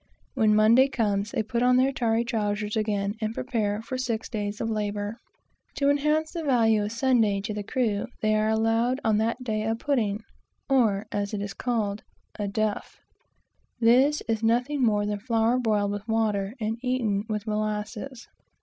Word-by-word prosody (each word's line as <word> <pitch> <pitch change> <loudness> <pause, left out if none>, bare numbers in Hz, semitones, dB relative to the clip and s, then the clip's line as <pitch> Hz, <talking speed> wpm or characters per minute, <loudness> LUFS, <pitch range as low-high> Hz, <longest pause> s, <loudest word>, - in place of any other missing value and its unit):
When 220 -5 +3
Monday 230 +5 +6
comes, 210 -6 -1
they 230 -2 -1
put 235 +2 -2
on 250 0 +4
their 260 +2 +3
tarry 230 -2 +1
trowsers 210 -2 -2
again, 205 -2 0
and 215 +1 -2
prepare 215 -3 -2
for 255 +2 -4
six 230 -4 -2
days 205 -2 -3
of - - -2
labor. 210 0 -2 0.6
To 280 0 +3
enhance 300 +2 +1
the 335 -2 -4
value 230 -6 +3
of 205 - -2
the 225 - -7
Sabbath 230 -6 +2
to 215 +1 -3
the 210 - -3
crew, 220 -1 -1
they 215 0 +1
are 215 0 +2
allowed 225 +3 +1
on 215 -1 +2
that 230 +3 -1
day 215 -3 -1
a 225 +1 0
pudding, 225 -5 -1 0.4
or, 220 -7 +2
as 205 +1 -2
it 200 - -3
is 205 - -5
called, 215 -4 -2 0.4
a 205 - -1
"duff." 215 +1 -2 0.8
This 260 +6 +4
is 225 -1 0
nothing 245 +5 +1
more 210 -4 +2
than 205 0 -2
flour 230 +2 +1
boiled 210 -4 +1
with 205 +1 -5
water, 215 -2 0
and 220 +1 -2
eaten 240 -6 0
with 210 -1 -2
molasses. 215 +3 -4
220 Hz, 175 wpm, -26 LUFS, 210-245 Hz, 0.8 s, Monday